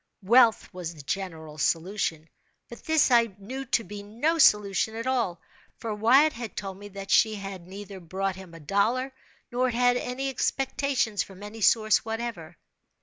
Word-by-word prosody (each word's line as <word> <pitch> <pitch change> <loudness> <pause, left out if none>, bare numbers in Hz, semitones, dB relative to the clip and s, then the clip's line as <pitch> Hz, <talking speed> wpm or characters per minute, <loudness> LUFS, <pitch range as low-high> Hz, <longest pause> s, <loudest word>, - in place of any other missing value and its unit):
Wealth 230 +2 +5
was 175 -2 -6
the 150 - -11
general 160 -3 -5
solution—but 165 +5 -3
this 315 -4 +3
I 230 -4 +4
knew 260 +7 -6
to 235 -2 +1
be 205 +1 -8
no 240 +11 -1
solution 210 -3 +4
at 230 +1 -4
all; 235 -10 0 0.4
for 225 -2 -4
Wyatt 255 +9 +4
had 235 -2 -7
told 195 -1 -5
me 205 - -9
that 195 -1 -8
she 220 -2 +4 0.2
neither 190 +2 -10
brought 190 +3 -3
him 190 -3 -12
a - - -10
dollar 225 - 0 0.4
nor 250 +1 +1
had 245 +1 +3
any 255 +2 -3
expectations 265 -4 0
from 195 0 -8
any 215 +2 -9
source 215 0 +4
whatever. 225 -8 -5
210 Hz, 155 wpm, -27 LUFS, 190-245 Hz, 0.4 s, Wealth